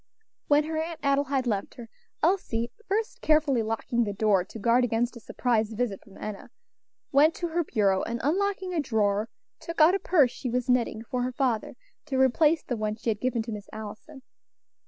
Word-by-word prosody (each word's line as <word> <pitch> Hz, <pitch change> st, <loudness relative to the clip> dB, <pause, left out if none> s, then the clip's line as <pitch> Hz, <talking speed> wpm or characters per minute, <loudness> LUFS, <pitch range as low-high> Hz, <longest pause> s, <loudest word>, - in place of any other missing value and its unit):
When 295 Hz, +1 st, +4 dB
her 315 Hz, +1 st, -3 dB
Aunt 325 Hz, 0 st, -5 dB
Adelaide 275 Hz, -1 st, +1 dB
left 205 Hz, -5 st, -2 dB
her, 235 Hz, -2 st, -9 dB, 0.4 s
Elsie 245 Hz, -10 st, +1 dB, 0.2 s
first 435 Hz, +3 st, -2 dB
carefully 305 Hz, -5 st, +3 dB
locking 225 Hz, +2 st, -1 dB
the 205 Hz, -2 st, -3 dB
door 200 Hz, -2 st, +2 dB
to 190 Hz, -, -11 dB
guard 235 Hz, +3 st, +3 dB
against 240 Hz, +1 st, 0 dB
a -, -, -8 dB
surprise 225 Hz, -1 st, 0 dB
visit 220 Hz, -3 st, -2 dB
from 200 Hz, -3 st, -16 dB
Enna 215 Hz, -2 st, -7 dB, 0.6 s
went 300 Hz, +3 st, +5 dB
to 345 Hz, -, -3 dB
her 340 Hz, +1 st, 0 dB
bureau, 200 Hz, -8 st, +1 dB
and 235 Hz, +1 st, -3 dB
unlocking 375 Hz, +4 st, 0 dB
a 340 Hz, -, 0 dB
drawer, 215 Hz, -5 st, 0 dB, 0.3 s
took 335 Hz, 0 st, -6 dB
out 315 Hz, +3 st, +7 dB
a 395 Hz, -, +1 dB
purse 300 Hz, -11 st, +3 dB
she 250 Hz, -, -5 dB
was 250 Hz, +1 st, -1 dB
knitting 245 Hz, -3 st, +1 dB
for 250 Hz, +2 st, -3 dB
her 250 Hz, +1 st, -1 dB
father, 245 Hz, -4 st, -1 dB, 0.3 s
to 270 Hz, -3 st, -1 dB
replace 300 Hz, +5 st, +3 dB
the 245 Hz, -, -3 dB
one 215 Hz, 0 st, -2 dB
she 230 Hz, +1 st, -1 dB
had 210 Hz, -, -5 dB
given 245 Hz, -3 st, 0 dB
to 230 Hz, -, -6 dB
Miss 210 Hz, -1 st, -7 dB
Allison. 220 Hz, +6 st, -9 dB
245 Hz, 195 wpm, -27 LUFS, 220-300 Hz, 0.6 s, out